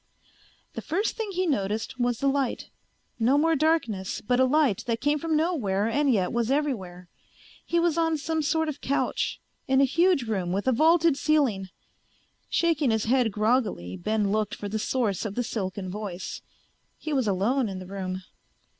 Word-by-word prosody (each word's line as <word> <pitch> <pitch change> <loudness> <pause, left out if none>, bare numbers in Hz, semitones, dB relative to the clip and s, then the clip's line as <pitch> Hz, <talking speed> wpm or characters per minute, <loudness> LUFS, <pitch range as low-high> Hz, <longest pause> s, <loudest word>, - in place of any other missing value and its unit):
The - - -5
first 390 +7 -1
thing 445 -2 -3
he 370 -1 -1
noticed 225 - -2
was 245 -1 +1
the 275 - 0
light. 275 -2 -1 0.5
No 250 +5 +3
more 325 +2 +3
darkness, 270 - 0
but 245 +4 0
a 260 - +5
light 270 -6 +2
that 230 -1 0
came 290 +2 +1
from 320 0 0
nowhere 230 - 0
and 280 +4 +2
yet 190 -6 +1
was 235 -1 0
everywhere. 205 -12 -2 0.6
He 340 - 0
was 335 -1 +1
on 325 -1 +2
some 320 +2 -1
sort 320 +2 +1
of 295 -2 -5
couch, 280 - -1 0.3
in 265 0 +3
a - - +6
huge 335 +2 +3
room 195 -6 -2
with 200 +6 -2
a - - +5
vaulted 320 +3 +4
ceiling. 270 -12 +1 0.8
Shaking 320 -5 +2
his 220 -1 +1
head 245 -1 +2
groggily, 210 - 0
Ben 210 +1 0
looked 215 0 0
for 205 - -6
the 215 +2 -3
source 215 -4 -1
of 210 -3 -4
the 245 - 0
silken 195 -4 -4
voice. 195 -3 -6 0.6
He 310 - -4
was 260 -5 +1
alone 215 +6 +1
in 190 - -5
the 185 - -8
room. 185 -1 -5
245 Hz, 180 wpm, -26 LUFS, 205-300 Hz, 0.8 s, a